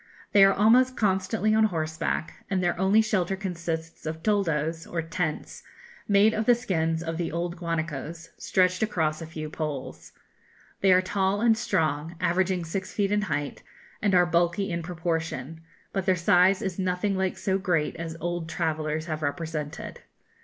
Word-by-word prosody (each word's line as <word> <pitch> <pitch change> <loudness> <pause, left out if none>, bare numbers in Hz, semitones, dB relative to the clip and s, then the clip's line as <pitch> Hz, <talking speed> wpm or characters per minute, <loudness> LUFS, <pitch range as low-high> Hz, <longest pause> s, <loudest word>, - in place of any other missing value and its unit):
They 200 - +7
are 195 - +7
almost 245 +6 +4
constantly 200 +1 +1
on 220 0 +5
horseback, 160 -3 -2
and 190 -2 0
their 175 - +1
only 195 +4 +4
shelter 195 -3 0
consists 170 -4 -5
of 160 +1 -5
toldos, 165 -6 0
or 165 -1 -3
tents, 165 -1 -3 0.5
made 205 +2 +5
of 220 0 -2
the 245 - +7
skins 165 -8 -1
of 165 -1 -3
the 170 -1 -2
old 170 +1 -2
guanacos, 165 -1 -4
stretched 185 0 +1
across 160 -7 0
a 165 - -6
few 155 -1 -6
poles. 150 -3 -6 0.7
They 195 - +4
are 185 0 +5
tall 195 +1 0
and 230 0 +4
strong, 160 -7 -1
averaging 180 0 +1
six 190 +4 -4
feet 200 -1 0
in 210 0 +2
height, 145 -8 -3 0.4
and 200 -3 +2
are 180 0 +6
bulky 175 +3 +1
in 170 0 -2
proportion; 165 -3 -3 0.3
but 195 -1 -2
their 185 - +4
size 180 +2 +4
is 190 -1 -3
nothing 185 +2 0
like 190 -1 -1
so 190 0 0
great 175 -6 0
as 165 -1 -5
old 175 -1 -3
travellers 155 -2 -2
have 155 -2 -4
represented. 155 +1 -4
175 Hz, 165 wpm, -26 LUFS, 160-195 Hz, 0.7 s, They